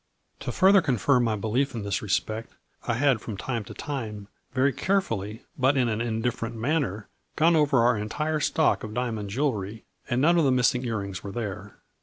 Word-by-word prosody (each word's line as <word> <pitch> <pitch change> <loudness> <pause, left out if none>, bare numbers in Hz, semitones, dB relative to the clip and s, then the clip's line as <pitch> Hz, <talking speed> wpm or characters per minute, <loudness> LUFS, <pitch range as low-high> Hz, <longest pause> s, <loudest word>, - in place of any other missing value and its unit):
To - - -4
further 195 +1 +5
confirm 130 -3 +2
my 110 -2 +1
belief 120 +6 -1
in 110 - -4
this 100 -1 -1
respect, 110 +2 -2 0.3
I 120 - +1
had 130 -3 +2
from 105 -4 -6
time 115 0 -3
to - - -10
time 110 -8 -5 0.2
very 130 +1 +2
carefully, 115 - -1 0.2
but 135 +2 +3
in 125 -2 +3
an 110 0 -1
in 115 -1 -2
different 115 -1 -2
manner, 115 - -1 0.3
gone 165 +2 +4
over 145 -6 +4
our 120 -3 +3
entire 150 +9 -1
stock 160 +1 +2
of 110 0 -6
diamond 115 -5 -2
jewelry, 110 -4 -2 0.2
and 120 0 +1
none 170 +5 +4
of - - +3
the 135 - +3
missing 125 0 +2
ear 115 -2 -1
rings 100 -1 -6
were 100 - -5
there. 105 -3 -5
120 Hz, 195 wpm, -26 LUFS, 105-140 Hz, 0.3 s, further